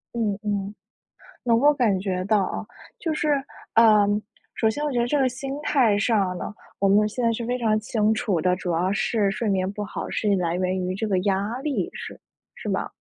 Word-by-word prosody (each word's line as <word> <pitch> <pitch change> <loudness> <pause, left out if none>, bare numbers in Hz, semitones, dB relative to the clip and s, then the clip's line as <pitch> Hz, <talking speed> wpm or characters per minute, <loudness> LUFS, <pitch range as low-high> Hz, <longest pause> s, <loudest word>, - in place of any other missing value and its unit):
嗯， 210 -4 0
嗯， 205 -1 -2 0.7
能 230 -2 +3
够 290 +3 +5
感 220 -8 +2
觉 185 -1 -2
到 210 +1 +3
啊， 215 - -4 0.4
就 325 -2 -1
是 305 -1 0 0.4
呃， 215 -3 +6 0.5
首 220 - +2
先 290 +6 -4
我 290 - -1
觉 240 - 0
得 235 - +1
这 290 +3 +1
个 260 -1 +3
心 270 +2 -6
态 240 -9 +3
上 195 -5 +1
呢， 210 - -6 0.2
我 195 - +2
们 210 +2 +4
现 240 +3 -3
在 230 - +3
是 230 +1 -3
非 250 +1 -1
常 215 -2 +2
清 220 0 +1
楚 195 -6 0
的， 180 +2 +2
主 180 -1 -4
要 180 +4 +1
是 210 -1 +1
睡 215 +2 -2
眠 190 -1 +1
不 210 - -5
好 205 - -5
是 205 -2 +1
来 170 -2 0
源 185 +1 0
于 185 - -2
这 220 +3 -2
个 190 -2 +2
压 200 +5 -1
力， 265 - -1
是 - - -8 0.3
是 - - -7
吧？ - - -2
210 Hz, 230 characters per minute, -24 LUFS, 195-235 Hz, 0.7 s, 呃